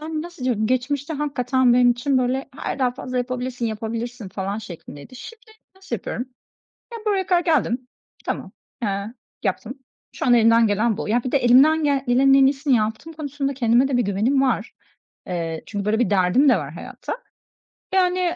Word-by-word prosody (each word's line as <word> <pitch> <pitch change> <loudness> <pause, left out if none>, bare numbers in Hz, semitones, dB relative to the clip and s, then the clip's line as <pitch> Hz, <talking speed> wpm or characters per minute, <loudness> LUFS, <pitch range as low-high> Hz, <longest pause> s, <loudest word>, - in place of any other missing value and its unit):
Yani 310 0 -4
nasıl 345 -6 -9
diyorum, 225 -4 +1
geçmişte 275 +5 -1
hakikaten 260 -3 +1
benim 245 0 +5
için 255 +2 +1
böyle, 255 +2 -1
"Hayır, - - -4
daha 255 -2 +2
fazla 255 0 -5
yapabilirsin, 250 -1 -3
yapabilirsin," 225 0 -5
falan 195 +2 -4
şeklindeydi. 175 - -10
Şimdi 465 - -11 0.3
nasıl 380 0 -4
yapıyorum? 245 - -5 0.7
Ya, 465 - -5
buraya 390 -3 +1
kadar 355 -2 +3
geldim, 255 -6 +1 0.4
tamam, - - -4 0.3
eee, 200 +1 -2 0.3
yaptım. 240 +3 -2 0.4
Şu - - -4
an 245 - +6
elimden 230 0 +5
gelen 215 +1 +1
bu. 225 - -4
Ya, 235 +3 +1
bir 255 - -3
de 280 - +4
elimden 275 +6 +5
gel 280 -2 +1
gelenin 270 +2 +5
en 270 0 +6
iyisini 275 0 +2
yaptığım 220 +9 -2
konusunda 285 -2 -3
kendime 245 +1 +3
de 265 - 0
bir 245 - +3
güvenim 220 +7 +1
var. 250 -4 0 0.5
Eee, 165 -2 -3
çünkü 205 -2 -4
böyle 215 +2 +1
bir 245 - +1
derdim 200 +8 +3
de 250 - +6
var 145 -4 -5
hayatta. 175 - -7 0.8
Yani 360 -1 +2
250 Hz, 175 wpm, -22 LUFS, 220-280 Hz, 0.8 s, an